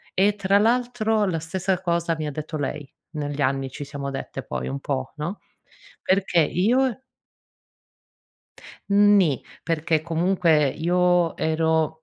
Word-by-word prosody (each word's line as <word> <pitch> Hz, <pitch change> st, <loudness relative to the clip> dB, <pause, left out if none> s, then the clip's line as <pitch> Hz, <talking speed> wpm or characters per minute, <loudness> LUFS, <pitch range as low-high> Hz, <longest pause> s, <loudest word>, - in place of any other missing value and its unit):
E 200 Hz, +2 st, +3 dB
tra 200 Hz, 0 st, +2 dB
l'altro 225 Hz, -1 st, +1 dB
la 180 Hz, -4 st, -1 dB
stessa 185 Hz, +3 st, -2 dB
cosa 170 Hz, -2 st, 0 dB
mi 155 Hz, -, -3 dB
ha -, -, -3 dB
detto 155 Hz, +2 st, -5 dB
lei, 145 Hz, 0 st, -4 dB, 0.2 s
negli 145 Hz, -2 st, -4 dB
anni 135 Hz, 0 st, 0 dB
ci 145 Hz, +3 st, -7 dB
siamo 140 Hz, -1 st, -5 dB
dette 135 Hz, -, -6 dB
poi 65 Hz, -1 st, -4 dB
un 70 Hz, +1 st, -4 dB
po', 65 Hz, -, -3 dB
no, 170 Hz, +7 st, -5 dB, 0.6 s
perché 190 Hz, -2 st, +2 dB
io 240 Hz, -, +1 dB, 1.9 s
Mh, 200 Hz, -, +2 dB, 0.2 s
ni. 160 Hz, -10 st, +2 dB, 0.2 s
Perché 165 Hz, -1 st, 0 dB
comunque 165 Hz, -2 st, +2 dB
io 175 Hz, +2 st, +1 dB
ero 160 Hz, 0 st, 0 dB
165 Hz, 135 wpm, -24 LUFS, 150-190 Hz, 1.9 s, E